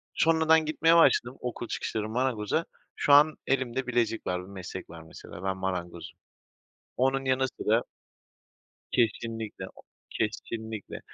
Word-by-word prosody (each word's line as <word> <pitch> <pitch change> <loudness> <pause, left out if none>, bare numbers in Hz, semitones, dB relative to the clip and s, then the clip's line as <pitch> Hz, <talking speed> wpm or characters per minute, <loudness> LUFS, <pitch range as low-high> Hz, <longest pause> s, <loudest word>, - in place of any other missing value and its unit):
Sonra 160 -1 +2
ben 160 -1 +6
gitmeye 165 +2 +3
başladım 130 -6 +4
okul 120 -1 -4
çıkışları 110 -1 -3
marangoza. 125 +4 0 0.3
Şu 145 - +3
an 150 +2 +6
elimde 130 -1 0
bilezik 120 -2 0
var, 90 0 -1
bir 90 - -12
meslek 95 -1 -8
var 85 0 -10
mesela 80 +2 -11
ben 95 0 -1
marangozum. 90 -2 -5 0.8
Onun 135 +1 +1
yanı 130 0 +2
sıra 115 -2 0 1.1
Kesinlikle, 115 -2 -1
o - - -15 0.3
kesinlikle. 110 -1 -4
115 Hz, 130 wpm, -28 LUFS, 100-135 Hz, 1.1 s, ben